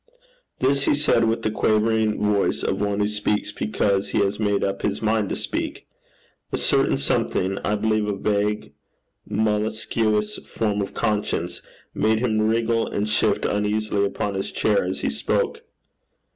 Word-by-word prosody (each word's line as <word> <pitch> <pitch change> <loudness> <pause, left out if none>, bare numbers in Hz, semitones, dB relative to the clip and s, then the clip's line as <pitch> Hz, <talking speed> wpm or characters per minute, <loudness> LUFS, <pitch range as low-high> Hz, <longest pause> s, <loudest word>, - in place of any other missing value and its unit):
This 140 +2 +2
he - - +3
said 140 -5 +3
with 115 +1 0
the 110 - 0
quavering 110 0 +2
voice 105 -1 +1
of - - -1
one 100 0 0
who 105 - +2
speaks 105 0 -1
because 100 -2 0
he - - -1
has 100 0 +1
made 105 -2 +1
up 95 0 -1
his 100 - -1
mind 110 -2 +1
to - - -1
speak. - - -4 0.7
A - - 0
certain - - +2
something, 95 +1 0
I 105 - 0
believe 110 0 +1
a 105 - -1
vague 105 +1 -1 0.6
molluscous 105 0 0
form 105 -2 -1
of 100 - -5
conscience, 105 -1 -1 0.3
made 110 +1 +2
him 110 -2 +1
wriggle 115 +1 +1
and 105 +1 -2
shift 105 0 +1
uneasily 105 0 0
upon 100 0 -1
his 95 0 -3
chair 105 -2 +2
as 95 +1 -3
he - - 0
spoke. 70 - -1
105 Hz, 160 wpm, -23 LUFS, 105-110 Hz, 0.7 s, he